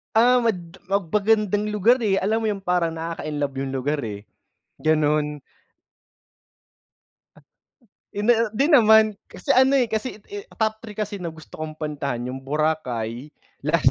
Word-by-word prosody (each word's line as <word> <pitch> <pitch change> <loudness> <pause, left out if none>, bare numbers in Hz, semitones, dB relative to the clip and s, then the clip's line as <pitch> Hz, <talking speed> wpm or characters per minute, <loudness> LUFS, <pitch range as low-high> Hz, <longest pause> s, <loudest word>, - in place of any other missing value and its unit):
Ah, 245 +3 +5
mad 185 -6 -2
mag 195 -4 -1
magandang 210 0 +2
lugar, 210 +5 +3
eh. 210 -4 +1
Alam 210 +3 +1
mo 225 - -3
yung 200 -2 -3
parang 175 -2 +1
nakaka-inlove 155 -4 -4
yung 135 0 -3
lugar, 145 +3 -1
eh, 105 -4 -5 0.6
ganun. 150 -1 +1 2.8
Hindi, 210 +4 +3 0.2
'di 275 +6 +2
naman. 220 -5 +6
Kasi 285 - -8
ano, 265 +1 +5
eh, 245 -3 +2
kasi, 220 +1 -3
eh, 410 +1 -7
top 220 - -2
3 215 -2 -9
kasi 210 -1 -4
na 170 -3 -5
gusto 160 -1 -13
kong 155 0 -5
puntahan 145 -5 -3
yung 130 - -5
Boracay, 135 -4 -2 0.3
last 150 -4 +3
180 Hz, 140 wpm, -23 LUFS, 150-220 Hz, 2.8 s, naman